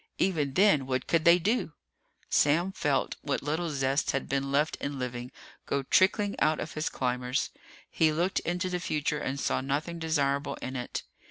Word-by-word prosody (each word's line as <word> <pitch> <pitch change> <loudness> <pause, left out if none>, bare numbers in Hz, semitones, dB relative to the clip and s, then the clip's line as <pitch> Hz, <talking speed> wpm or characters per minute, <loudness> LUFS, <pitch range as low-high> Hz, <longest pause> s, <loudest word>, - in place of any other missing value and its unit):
Even 150 -7 0
then, 185 -9 +4
what 130 -1 -1
could 165 -1 +1
they 170 +1 +8
do? 200 -1 0 0.5
Sam 170 +6 +3
felt 150 -7 0
what 145 - -2
little 160 +4 -1
zest 135 -1 0
had 135 - -2
been 135 0 -1
left 150 +3 +2
in 140 0 -4
living 125 -1 -4 0.4
go 140 -1 0
trickling 200 +7 +3
out 155 - +2
of 155 - -5
his 155 +1 -1
climbers. 125 0 -1 0.4
He 160 -1 +2
looked 175 +5 0
into 180 +2 -2
the 180 -1 -2
future 150 -2 -1
and 140 -1 -3
saw - - 0
nothing 150 +5 -2
desirable 140 -3 0
in 130 - -6
it. 125 -1 -4
150 Hz, 175 wpm, -29 LUFS, 135-170 Hz, 0.5 s, they